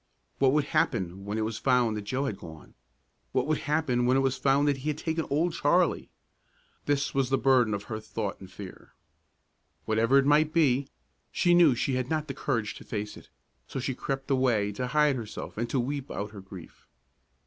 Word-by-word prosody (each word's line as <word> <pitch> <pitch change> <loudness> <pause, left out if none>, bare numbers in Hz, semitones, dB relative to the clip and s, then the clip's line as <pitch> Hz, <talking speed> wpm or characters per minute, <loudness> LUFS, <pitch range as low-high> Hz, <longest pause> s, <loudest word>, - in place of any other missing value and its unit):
What 135 -1 +4
would 150 0 +3
happen 95 -8 -1
when 105 +2 -3
it 110 - 0
was 110 0 -4
found 125 -4 +2
that 105 -1 -5
Joe 130 +6 -1
had 110 -8 -3
gone? 80 -1 -12 0.6
What - - +1
would 155 0 0
happen 130 -6 +1
when 130 +1 +4
it - - +3
was 135 -1 +1
found 135 +2 +2
that 140 -1 +2
he 140 +3 -3
had 150 - -2
taken 160 0 -2
Old 160 +5 +1
Charlie? 170 +2 +2 0.8
This 145 0 0
was 135 -2 +1
the 135 - +2
burden 130 -5 +3
of 100 - -6
her 110 0 -5
thought 110 -2 -4
and 95 -1 -12
fear. 95 -2 -11 0.9
Whatever 115 +5 +3
it 135 - +4
might 150 +2 +3
be, 140 -5 +3 0.4
she 175 - +3
knew 170 -7 +6
she 130 +3 -1
had 130 0 -2
not 155 -1 -1
the 135 - -4
courage 120 -6 -2
to - - -11
face 105 -1 -5
it, - - -14 0.4
so - - -5
she 130 +1 -2
crept 135 +2 -4
away 120 -6 +2
to 125 +5 -3
hide 150 0 +3
herself 110 -3 -7
and 115 +2 -3
to 135 - 0
weep 140 +2 -3
out 105 +1 -4
her 100 -2 -9
grief. 95 -3 -13
130 Hz, 205 wpm, -28 LUFS, 110-145 Hz, 0.9 s, knew